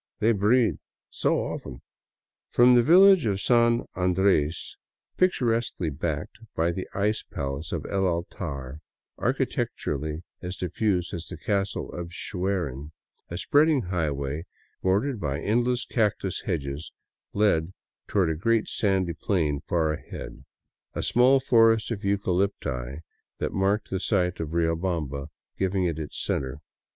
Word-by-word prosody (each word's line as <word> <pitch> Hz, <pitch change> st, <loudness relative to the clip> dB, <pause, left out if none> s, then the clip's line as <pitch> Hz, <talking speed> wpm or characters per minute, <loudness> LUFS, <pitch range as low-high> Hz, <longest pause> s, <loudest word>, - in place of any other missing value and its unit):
They 115 Hz, -, +3 dB
breed 110 Hz, +3 st, +3 dB, 0.3 s
so -, -, +1 dB
often! 60 Hz, -, -7 dB, 0.3 s
" -, -, -68 dB
From 125 Hz, +1 st, +7 dB
the 120 Hz, -, +7 dB
village 180 Hz, -, +7 dB
of 100 Hz, -2 st, 0 dB
San 120 Hz, +2 st, +3 dB
Andres, 90 Hz, -4 st, +1 dB, 0.4 s
picturesquely 115 Hz, -, +1 dB
backed 80 Hz, +4 st, -4 dB, 0.2 s
by 85 Hz, +1 st, +2 dB
the 95 Hz, +2 st, -5 dB
ice 105 Hz, +2 st, +1 dB
palace 70 Hz, +2 st, -5 dB
of -, -, -3 dB
El 95 Hz, -1 st, 0 dB
Altar, 70 Hz, -5 st, -4 dB, 0.4 s
architecturally 75 Hz, +3 st, -2 dB, 0.2 s
as 90 Hz, +1 st, -4 dB
diffuse 90 Hz, 0 st, -1 dB
as 85 Hz, -1 st, -5 dB
the 90 Hz, -, -7 dB
Castle 100 Hz, +3 st, -2 dB
of 85 Hz, -1 st, -6 dB
Schwerin, 85 Hz, -8 st, -3 dB, 0.4 s
a 85 Hz, -, -5 dB
spreading 145 Hz, -, +3 dB
highway, 75 Hz, -1 st, -2 dB, 0.3 s
bordered 105 Hz, +7 st, +1 dB
by 70 Hz, -4 st, -2 dB
endless 120 Hz, +6 st, +1 dB
cactus 105 Hz, -5 st, 0 dB
hedges, 75 Hz, -4 st, -3 dB, 0.4 s
led 95 Hz, -5 st, +2 dB, 0.4 s
toward 95 Hz, -6 st, +2 dB
a -, -, -1 dB
great 115 Hz, +7 st, +1 dB
sandy 95 Hz, -4 st, +1 dB
plain 75 Hz, -9 st, 0 dB
far 80 Hz, -3 st, +2 dB
ahead, -, -, -8 dB, 0.5 s
a -, -, -2 dB
small 130 Hz, +3 st, +5 dB
forest 115 Hz, -3 st, +4 dB
of 110 Hz, -, -2 dB
eucalypti 90 Hz, -9 st, -1 dB, 0.4 s
that -, -, -3 dB
marked 100 Hz, +2 st, 0 dB
the 95 Hz, -, 0 dB
site 90 Hz, -3 st, 0 dB
of 80 Hz, -, -3 dB
Riobamba 80 Hz, -4 st, -1 dB, 0.3 s
giving 95 Hz, -1 st, +1 dB
it 80 Hz, -3 st, -3 dB
center. 70 Hz, +1 st, -2 dB
95 Hz, 130 wpm, -26 LUFS, 80-110 Hz, 0.5 s, From